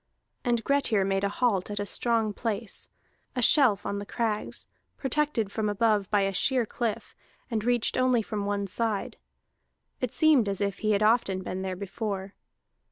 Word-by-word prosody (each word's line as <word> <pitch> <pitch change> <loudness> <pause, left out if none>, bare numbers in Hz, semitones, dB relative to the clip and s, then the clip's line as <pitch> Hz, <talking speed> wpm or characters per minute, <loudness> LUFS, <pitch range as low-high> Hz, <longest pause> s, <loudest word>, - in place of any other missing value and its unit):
And 235 -2 +1
Grettir 250 -8 +2
made 195 0 0
a 200 - +2
halt 205 -3 0
at 205 0 -3
a 205 - -2
strong 225 0 0
place, 220 0 -3 0.5
a 250 - 0
shelf 225 -8 +5
on 200 - -2
the 200 - -6
crags, 220 -3 -2 0.3
protected 270 -6 0
from 215 0 -1
above 205 -2 +1
by 205 -1 +3
a 195 0 0
sheer 250 +5 +2
cliff, 225 0 -4 0.4
and 220 -2 -1
reached 240 -1 +1
only 255 -3 +3
from 205 -1 -3
one 200 0 -1
side. 210 +1 -2 0.8
It 250 -2 -2
seemed 295 -9 +4
as 195 - -2
if 200 -2 -1
he 215 -1 +1
had 205 +1 +2
often 210 -4 +2
been 185 +1 -4
there 190 -1 -3
before. 200 0 -4
215 Hz, 170 wpm, -27 LUFS, 200-235 Hz, 0.8 s, shelf